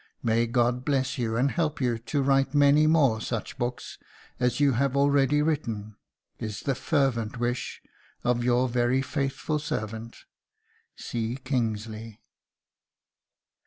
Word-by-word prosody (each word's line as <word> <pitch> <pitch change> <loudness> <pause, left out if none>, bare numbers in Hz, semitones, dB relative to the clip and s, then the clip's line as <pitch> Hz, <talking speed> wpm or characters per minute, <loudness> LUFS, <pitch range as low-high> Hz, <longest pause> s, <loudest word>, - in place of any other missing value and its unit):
May 115 +1 +2
God 120 +1 +1
bless 135 -2 0
you, 115 -2 -1
and 135 +3 +2
help 155 -3 -1
you 120 -4 0
to 140 +5 -1
write 135 +1 +2
many 145 +1 +5
more 140 -9 +3
such 115 -3 -4
books 120 +1 -4 0.4
as 125 +1 +1
you 145 -1 +4
have 135 +2 +1
already 140 +1 +3
written, 115 -9 -2 0.4
is 105 -3 -5
the 140 - 0
fervent 130 -5 0
wish 120 +1 -3 0.4
of 120 0 +1
your 125 +1 +3
very 125 +2 +1
faithful 140 +2 -2
servant, 110 -5 -5 0.7
"C. 115 0 -3
KINGSLEY." 110 -3 -3
125 Hz, 125 wpm, -27 LUFS, 115-140 Hz, 0.7 s, many